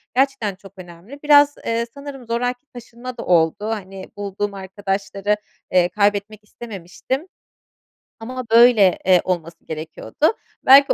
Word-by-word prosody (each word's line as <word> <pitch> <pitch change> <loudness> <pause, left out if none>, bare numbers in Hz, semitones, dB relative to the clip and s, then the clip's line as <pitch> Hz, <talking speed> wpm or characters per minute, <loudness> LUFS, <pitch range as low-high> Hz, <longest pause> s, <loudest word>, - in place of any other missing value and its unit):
gerçekten 265 -6 +1
çok 195 0 -16
önemli. 180 +9 -12
Biraz, 290 -1 +6
eee, 230 0 0
sanırım 280 -3 -9
zoraki 245 +3 -2
taşınma 240 +1 -9
da - - -6
oldu, 165 -3 +3
hani, 195 -3 -5
bulduğum 205 0 -3
arkadaşları, 195 +1 -2 0.4
eee, 180 -1 +4
kaybetmek 205 +1 0
istememiştim. 215 - -6 0.9
Ama, 255 +3 -5
böyle, 230 -5 +6
eee, 180 -2 +5
olması 170 -2 -4
gerekiyordu. 160 - -2 0.3
Belki 275 +1 +8
210 Hz, 120 wpm, -21 LUFS, 190-250 Hz, 0.9 s, Belki